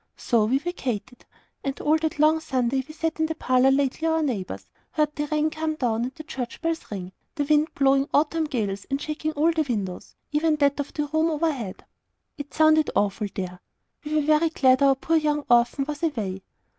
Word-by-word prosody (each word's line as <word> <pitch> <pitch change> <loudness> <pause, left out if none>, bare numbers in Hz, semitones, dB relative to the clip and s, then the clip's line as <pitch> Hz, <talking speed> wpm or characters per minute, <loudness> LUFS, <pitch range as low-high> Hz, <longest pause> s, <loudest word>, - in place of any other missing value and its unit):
So 230 -4 +2
we 250 +5 +2
vacated; 255 - -4 0.4
and 275 0 -3
all 305 +1 +3
that 315 -1 -2
long 310 +2 +4
Sunday 265 -3 0
we - - -9
sat 320 0 -3
in 315 - +2
the 320 - -3
parlour 255 -3 +3
lately 275 +3 +1
our 320 0 +2
neighbour's, 185 - -3 0.3
heard 300 -1 0
the 295 - -1
rain 305 +1 +1
come 315 0 -2
down, 235 -6 0
and 255 - -7
the 310 - -9
church 260 -6 -6
bells 330 0 -3
ring; 185 -3 -6 0.2
the 290 - 0
wind 300 +1 +3
blowing 275 0 +3
autumn 315 +2 +2
gales, 210 -9 -3
and 275 0 -1
shaking 310 +1 -3
all 310 +3 +3
the 320 -1 0
windows, 205 -10 -4 0.2
even 305 +1 +2
that 285 -1 +2
of 285 - -3
the 295 - -1
room 315 +2 +2
overhead. 295 - -2 0.5
It 285 -2 -8
sounded 310 +1 +4
awful 205 +1 +1
THERE. 180 -2 -5 0.4
We 305 +1 -3
were 305 - +3
very 305 +2 +3
glad 260 -4 +4
the 275 -1 +5
poor 325 +5 +1
young 295 -1 0
orphan 240 +3 +3
was 295 -1 -5
away. 215 - -2
290 Hz, 200 wpm, -25 LUFS, 250-310 Hz, 0.5 s, the